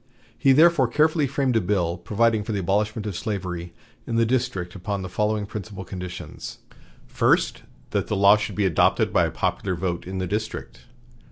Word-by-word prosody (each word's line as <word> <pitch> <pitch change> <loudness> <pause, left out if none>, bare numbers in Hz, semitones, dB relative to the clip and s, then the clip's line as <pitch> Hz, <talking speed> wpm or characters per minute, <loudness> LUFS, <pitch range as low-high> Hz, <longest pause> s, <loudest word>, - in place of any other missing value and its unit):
He 135 +3 +3
therefore 155 -1 +5
carefully 155 +3 +2
framed 135 -2 0
a 110 - +4
bill 90 -3 0
providing 105 +5 +1
for 110 - -4
the 100 - -1
abolishment 105 +3 0
of 105 -4 -4
slavery 90 -4 -4 0.4
in 115 - -2
the 115 0 +3
District 120 -7 -1
upon 100 +1 -4
the 95 - -5
following 105 +2 0
principal 100 -2 -7
conditions: 90 0 -7 0.5
First. - - +1 0.3
That - - 0
the - - -1
law 100 +1 +7
should 105 -2 -3
be 105 - +1
adopted 85 -5 +2
by - - +4
a - - -3
popular 95 -2 -1
vote 85 0 -3
in 95 +1 -4
the 95 - -1
District. 105 +4 -5
105 Hz, 180 wpm, -24 LUFS, 95-115 Hz, 0.5 s, law